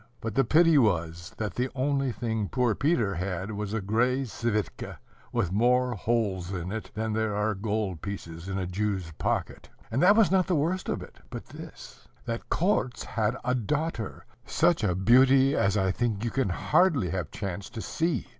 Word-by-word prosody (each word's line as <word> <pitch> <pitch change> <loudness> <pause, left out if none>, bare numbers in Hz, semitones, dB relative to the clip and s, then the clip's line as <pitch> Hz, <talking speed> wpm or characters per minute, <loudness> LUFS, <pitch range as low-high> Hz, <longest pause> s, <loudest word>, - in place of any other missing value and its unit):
But 115 -2 -4
the 135 - +3
pity 160 +4 +5
was, 85 -4 0
that 110 -2 -3
the 125 +1 -1
only 135 0 0
thing 110 -4 -2
poor 125 -3 +1
Peter 120 - +1
had 95 +2 -3
was 105 -1 -4
a 110 0 -1
gray 125 +7 +1
svitka 110 -1 -3 0.3
with 115 -7 0
more 125 +4 +3
holes 100 -4 -1
in 90 -1 -4
it 110 0 -5
than 110 0 -2
there 110 -1 0
are 105 +1 +1
gold 100 -3 -2
pieces 90 -3 -6
in 95 - -2
a 95 - -1
Jew's 95 -2 -2
pocket. - - -2 0.2
And 125 +5 +1
that 195 +3 +7
was 220 -4 +4
not 190 -1 +3
the 185 - +2
worst 170 +6 0
of - - -2
it, - - -14
but - - -7
this: - - -12 0.2
that 115 -1 -4
Korzh 165 -9 0
had 110 +3 -1
a 125 - +2
daughter, 130 -1 -2 0.2
such 165 -5 +2
a 90 -4 +1
beauty 130 +7 +5
as 100 +2 +2
I 95 -2 +2
think 110 0 -1
you 120 - -1
can 135 -7 0
hardly 140 - +2
have 90 -5 -3
chanced 100 +2 -6
to 115 - -4
see. 165 0 -1
110 Hz, 185 wpm, -27 LUFS, 100-130 Hz, 0.3 s, that